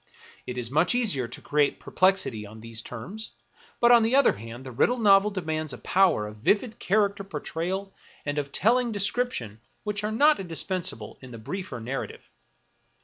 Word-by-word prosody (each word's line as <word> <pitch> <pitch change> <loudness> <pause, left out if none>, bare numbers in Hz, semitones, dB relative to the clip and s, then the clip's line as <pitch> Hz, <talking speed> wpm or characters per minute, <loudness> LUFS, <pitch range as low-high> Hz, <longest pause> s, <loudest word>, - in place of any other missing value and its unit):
It 125 - -5
is 120 -1 -3
much 165 - +3
easier 180 - +2
to 120 - -9
create 145 -1 +1
per - - -11
plexity 185 - +2
on 110 +1 -12
these 115 0 -6
terms; 185 - -8 0.5
but 235 0 +5
on 240 -1 +8
the 225 +3 +2
other 280 -1 +6
hand, 115 +4 -9
the 130 - -7
riddle 240 - +2
novel 205 -2 +5
demands 155 -6 -3
a - - -7
power 185 - +2
of 105 0 -9
vivid 215 - +1
character 200 0 +1
portrayal 190 +3 -4 0.3
and 145 +1 -1
of 140 -1 -4
telling 240 - +3
description 200 - -1 0.2
which 210 -1 -2
are 210 - -1
not 295 +7 +4
indispensable 170 - -3
in 130 - -11
the 120 - -9
"briefer 180 - -6
narrative. 130 +4 -5
180 Hz, 175 wpm, -26 LUFS, 125-210 Hz, 0.5 s, on